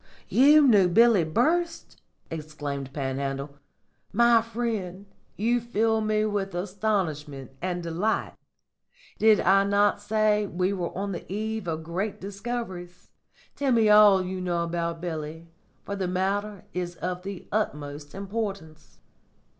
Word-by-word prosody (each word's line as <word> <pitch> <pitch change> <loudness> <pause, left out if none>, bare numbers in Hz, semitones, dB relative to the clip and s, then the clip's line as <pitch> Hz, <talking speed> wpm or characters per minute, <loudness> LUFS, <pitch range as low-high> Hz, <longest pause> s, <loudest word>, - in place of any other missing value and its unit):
"You 295 +3 +6
knew 205 -7 +6
Billy 225 +1 +5
Burst!" 330 - -1 0.3
exclaimed 145 -3 -5
Panhandle. 140 +1 -4 0.5
"My 235 +1 +5
friend, 220 -5 -4 0.3
you 235 +3 +1
fill 225 -1 +1
me 215 0 +1
with 200 -3 -2
astonishment 175 - -2
and 180 -1 -2
delight. 170 +7 -1 0.9
Did 215 -1 +5
I 195 +2 +4
not 200 +1 +2
say 210 0 +1
we 185 +2 -1
were 180 -3 -2
on 200 +1 -2
the 175 0 -7
eve 220 -1 -3
of 160 -1 -3
great 190 +6 -3
discoveries? 195 -3 -6 0.4
Tell 280 -2 0
me 225 -2 +4
all 210 -3 +7
you 185 0 -4
know 175 -2 -1
about 170 0 -3
Billy, 160 -1 -5 0.4
for 200 - -4
the 190 -2 -2
matter 195 +2 -2
is 175 -1 -3
of 180 +1 -4
the 195 -1 -7
utmost 145 -8 -3
importance." 195 -6 -5
195 Hz, 130 wpm, -26 LUFS, 170-215 Hz, 0.9 s, all